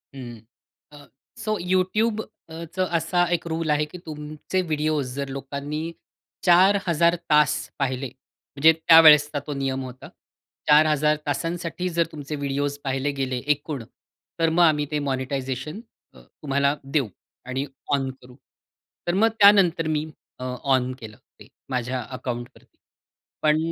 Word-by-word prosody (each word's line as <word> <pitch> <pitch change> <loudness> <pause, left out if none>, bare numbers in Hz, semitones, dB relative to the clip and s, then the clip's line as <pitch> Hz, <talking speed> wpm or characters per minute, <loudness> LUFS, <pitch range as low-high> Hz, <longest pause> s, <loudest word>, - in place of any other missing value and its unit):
हं. 120 -4 -8 0.5
अ, 145 -1 -14 0.3
सो 215 0 -2
YouTubeचं 185 -2 -1
असा 175 +2 +1
1 170 - -1
रूल 160 0 -2
आहे 150 0 +2
की - - -8
तुमचे 155 +4 -4
व्हिडिओ 155 0 0
जर 140 +1 -3
लोकांनी 140 +2 -5 0.6
4000 175 -2 +4
तास 150 -1 +5 0.3
पाहिले, 135 -1 -1
म्हणजे 140 +4 0
त्यावेळेसचा 155 -2 +7
तो 150 - -3
नियम 135 0 -1
होता. 130 0 -9 0.6
4000 150 0 +4
तासांसाठी 170 +5 -2
जर 170 -1 +1
तुमचे 150 0 -6
व्हिडिओस 140 0 -2
पाहिले 135 +1 -1
गेले 130 -1 -1 0.2
एकूण, 145 -3 -6 0.6
तर 165 0 +3
मग 170 +2 +3
आम्ही 150 -3 +3
ते 150 - 0
मॉनिटायझेशन 135 - -3 0.4
तुम्हाला 140 0 -1
देऊ 135 -2 0 0.4
आणि 130 +2 -2 0.3
ऑन 135 -1 +1
करू 125 0 -15 0.7
तर 175 - +1
मग 210 +5 +4
त्यानंतर 195 -5 +6
मी 155 -1 0 0.3
अ, - - -6 0.2
ऑन 130 -2 +2
केलं 110 -3 -10 0.2
ते - - -14 0.2
माझ्या 125 0 -2
अकाउंटवरती. 125 -1 -7 0.6
पण 155 0 +3
150 Hz, 125 wpm, -24 LUFS, 135-165 Hz, 0.7 s, त्यावेळेसचा